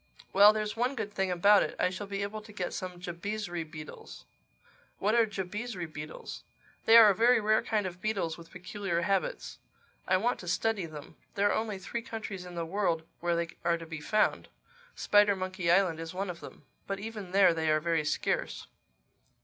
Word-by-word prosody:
—Well, 205 +2 +8
there's 215 -1 -2
one 250 +4 0
good 215 -4 -4
thing 190 -1 0
about 200 +3 +5
it: - - -2
I 180 - +2
shall 195 +2 -6
be 200 0 -3
able 215 +2 -5
to 215 0 -13
get 185 -4 -4
some 180 -1 -5
Jabizri 175 0 -4
beetles." 155 -1 -10 0.7
"What 210 +2 +1
are 230 -1 +4
Jabizri 200 0 -4
beetles?" 155 -1 -8 0.4
"They 225 +1 +8
are 220 -3 +9
a - - -1
very 240 +3 +5
rare 215 0 +3
kind 215 -3 -1
of 180 0 -6
beetles 195 -7 -1
with 170 -1 -13
peculiar 180 -1 -3
habits. 200 - -1 0.5
I 185 - +4
want 240 +6 0
to 175 - -9
study 200 0 0
them. 150 -2 -11 0.2
There 205 0 +3
are - - +1
only 220 -2 -2
three 195 +5 -5
countries 220 -6 -6
in 175 - -9
the 170 -1 -2
world 170 -2 0 0.2
where 170 0 0
they 170 0 -1
are 170 0 +2
to 165 - -9
be 160 -2 -7
found. 215 +7 +1 0.5
Spidermonkey 185 -4 +2
Island 175 -3 +3
is 165 +2 -6
one 190 0 -2
of 170 - -11
them. - - -12 0.2
But 195 0 -3
even 210 -3 -6
there 190 -2 +5
they 160 -1 -1
are 155 0 +3
very 165 0 0
scarce." 145 - -1
190 Hz, 195 wpm, -30 LUFS, 170-210 Hz, 0.7 s, are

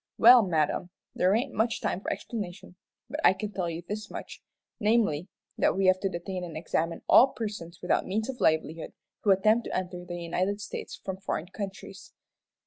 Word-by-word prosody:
"Well, 245 +1 +9
madam, 170 -2 0 0.2
there 185 +3 +3
ain't 255 +3 -1
much 225 +2 +1
time 185 - -2
for - - -3
explanation, 185 -5 -6 0.3
but 290 +4 -5
I - - +7
can 205 +2 -5
tell 185 -3 -2
you 165 +1 -5
this 210 0 -5
much, - - -8 0.4
namely, 210 -7 +2 0.3
that - - +3
we 195 - +2
have 185 0 +5
to 195 - 0
detain 180 +1 -5
and 165 -3 -6
examine 165 +1 -2
all 260 - +8
persons 195 -7 -6
without 180 - +1
means 215 +3 -1
of 265 -2 -6
livelihood 160 0 +1 0.3
who 210 - -1
attempt 215 +4 +4
to - - -2
enter 180 -1 -4
the 175 0 -6
United 185 +4 -1
States 210 - -6
from 190 -1 -3
foreign 180 -3 -4
countries." 195 -1 -8
190 Hz, 185 wpm, -28 LUFS, 175-215 Hz, 0.4 s, Well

